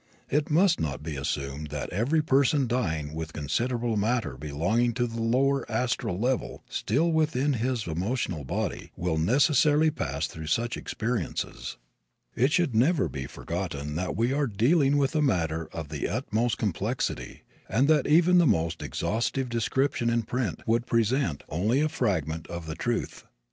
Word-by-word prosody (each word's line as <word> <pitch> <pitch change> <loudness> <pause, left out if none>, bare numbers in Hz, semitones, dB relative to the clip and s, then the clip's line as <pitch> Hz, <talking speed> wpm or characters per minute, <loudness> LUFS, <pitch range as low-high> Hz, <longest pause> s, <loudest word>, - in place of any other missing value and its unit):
It 145 +1 +1
must 170 +3 +4
not 75 -1 -3
be 80 -1 -4
assumed 70 +1 -3
that 75 -2 -5
every 135 - +1
person 140 0 +3
dying 80 -12 -1
with 80 0 -5
considerable 115 - -1
matter 110 - 0
belonging 85 - 0
to 120 -1 +1
the 115 -1 -4
lower 135 +4 +2
astral 110 -5 -1
level 125 +4 -1
still 155 +11 0
within 150 -3 +2
his 120 -1 -1
emotional 90 - -2
body 65 - -3
will 85 -2 0
necessarily 145 - +4
pass 70 - -2
through 80 0 -7
such 115 +9 0
experiences. 115 -5 -3 0.6
It 130 +5 +3
should 165 -6 +2
never 135 +7 +3
be 65 -2 -5
forgotten 80 -5 -4
that 90 +1 -2
we 120 +4 +1
are 145 0 +1
dealing 135 - +3
with 135 0 +1
a 155 - +3
matter 80 - 0
of 80 -3 -6
the 75 -2 -2
utmost 120 -1 0
complexity 105 +5 -2 0.3
and 125 +7 +3
that 150 -3 +3
even 175 +3 +5
the 170 - +5
most 85 -6 +1
exhaustive 125 +4 -1
description 120 +2 0
in 115 0 +1
print 120 -2 -3
would 115 +2 +1
present 115 - +1
only 105 - +1
a 155 - +3
fragment 85 - -1
of 85 -1 -6
the 80 - -4
truth. 115 +8 -3
115 Hz, 160 wpm, -27 LUFS, 80-135 Hz, 0.6 s, even